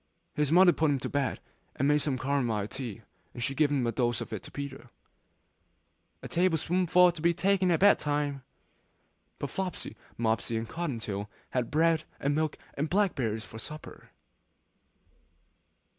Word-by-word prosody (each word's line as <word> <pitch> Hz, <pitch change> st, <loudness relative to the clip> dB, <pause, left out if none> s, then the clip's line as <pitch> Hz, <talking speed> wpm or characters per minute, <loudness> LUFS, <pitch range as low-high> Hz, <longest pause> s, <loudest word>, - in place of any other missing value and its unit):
His 150 Hz, -1 st, 0 dB
mother 175 Hz, +1 st, +7 dB
put 160 Hz, -1 st, +2 dB
him 140 Hz, -, +2 dB
to -, -, -3 dB
bed, 140 Hz, -2 st, -1 dB, 0.4 s
and 140 Hz, -, +1 dB
made 150 Hz, 0 st, +4 dB
some 140 Hz, -3 st, 0 dB
camomile 125 Hz, -7 st, 0 dB
tea; 120 Hz, -4 st, -6 dB, 0.3 s
and 120 Hz, -, -4 dB
she 135 Hz, -, -1 dB
gave 145 Hz, +1 st, +2 dB
a 125 Hz, -5 st, +1 dB
dose 120 Hz, -2 st, 0 dB
of -, -, -6 dB
it 105 Hz, -, -4 dB
to -, -, -10 dB
Peter! 140 Hz, -2 st, -7 dB, 1.3 s
'One -, -, -8 dB
table 175 Hz, -1 st, +2 dB
spoonful 180 Hz, +2 st, +4 dB
to 170 Hz, -2 st, -9 dB
be 170 Hz, +1 st, +3 dB
taken 190 Hz, +1 st, +2 dB
at 170 Hz, -1 st, +2 dB
bed 205 Hz, +1 st, +6 dB
time.' 145 Hz, -2 st, -1 dB, 1.0 s
But -, -, -5 dB
Flopsy, 190 Hz, -2 st, -4 dB, 0.2 s
Mopsy, 115 Hz, 0 st, 0 dB
and 115 Hz, 0 st, -3 dB
Cotton 155 Hz, 0 st, -3 dB
tail 105 Hz, -2 st, -4 dB, 0.2 s
had 125 Hz, -2 st, -1 dB
bread 160 Hz, 0 st, +2 dB
and 140 Hz, +1 st, +1 dB
milk 155 Hz, 0 st, 0 dB, 0.2 s
and 150 Hz, +2 st, -2 dB
blackberries 135 Hz, -, 0 dB
for 110 Hz, -, -10 dB
supper. 155 Hz, +6 st, -8 dB
145 Hz, 160 wpm, -29 LUFS, 120-165 Hz, 1.3 s, mother